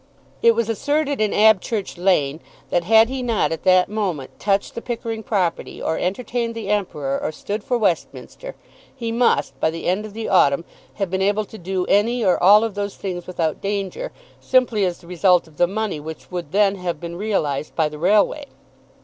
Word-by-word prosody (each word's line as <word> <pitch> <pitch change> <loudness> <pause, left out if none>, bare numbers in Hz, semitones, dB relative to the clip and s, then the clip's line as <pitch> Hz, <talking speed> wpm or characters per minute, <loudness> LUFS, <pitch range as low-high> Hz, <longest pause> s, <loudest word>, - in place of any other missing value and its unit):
It 230 -1 +5
was 230 -1 0
asserted 285 +4 0
in 215 - +2
Abchurch 215 -1 +2
Lane 165 -5 +1 0.3
that 175 -1 +1
had 225 +3 +6
he 260 +1 -4
not 230 -8 0
at 165 - -3
that 185 -1 +5
moment 190 -10 -4
touched 200 -1 0
the 235 - -6
Pickering 230 -2 -4
property, 195 -8 -2
or 160 - -1
entertained 230 +4 -2
the 220 -3 -5
Emperor, 150 -10 -1
or - - -2
stood 205 +6 -5
for 250 -1 0
Westminster, 235 - -3 0.4
he 235 -3 -4
must, 230 - +1
by 160 - +2
the 165 +1 -6
end 185 +4 +1
of 205 - -13
the 225 +1 -4
autumn, 165 -4 +3 0.3
have 195 -4 -3
been 190 0 -1
able 205 +2 +1
to 220 - -13
do 185 +1 -2
any 230 +4 +2
or 180 - +3
all 205 +4 +7
of 225 -2 -2
those 205 0 -4
things 180 -3 -5
without 165 -4 -2
danger, 200 - -3 0.3
simply 240 -6 +2
as 180 -2 -2
the - - -19
result 180 0 +2
of 155 -2 -20
the 175 - +4
money 205 -3 -3
which 160 +4 -9
would 175 -5 -5
then 200 0 +3
have 175 -4 -3
been 170 +1 -6
realised 165 -8 -2
by 160 -2 +2
the 150 0 -9
railway. 210 - +2
200 Hz, 195 wpm, -21 LUFS, 175-225 Hz, 0.4 s, all